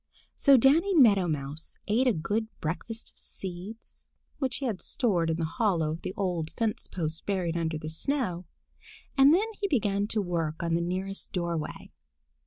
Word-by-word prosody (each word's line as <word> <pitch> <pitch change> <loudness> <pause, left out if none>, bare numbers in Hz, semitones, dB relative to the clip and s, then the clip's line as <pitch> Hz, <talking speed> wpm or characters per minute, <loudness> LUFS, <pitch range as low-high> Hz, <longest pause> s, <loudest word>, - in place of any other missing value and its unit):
So 280 -2 +6
Danny 325 - +4
Meadow 205 - +6
Mouse 150 0 -4
ate 240 +5 +3
a - - +6
good 210 +7 -1
breakfast 220 +8 -4
of - - -16
seeds 190 +4 -6 0.3
which 260 -3 0
he 275 - -3
had 215 -7 -2
stored 185 - +1
in 160 - 0
the 165 - 0
hollow 170 -5 +1
in 160 - -4
the 185 - -5
old 175 -5 -1
fence 225 -2 -1
post 160 -3 -3
buried 180 -4 0
under 165 -2 -1
the 155 0 -6
snow, 180 - -2 0.7
and 270 +1 +7
then 375 +7 +4
he 405 - 0
began 205 - +1
work 170 -6 -1
on 170 -1 0
the 170 - +2
nearest 190 +3 -3
doorway. 170 -4 -3
185 Hz, 170 wpm, -28 LUFS, 165-230 Hz, 0.7 s, and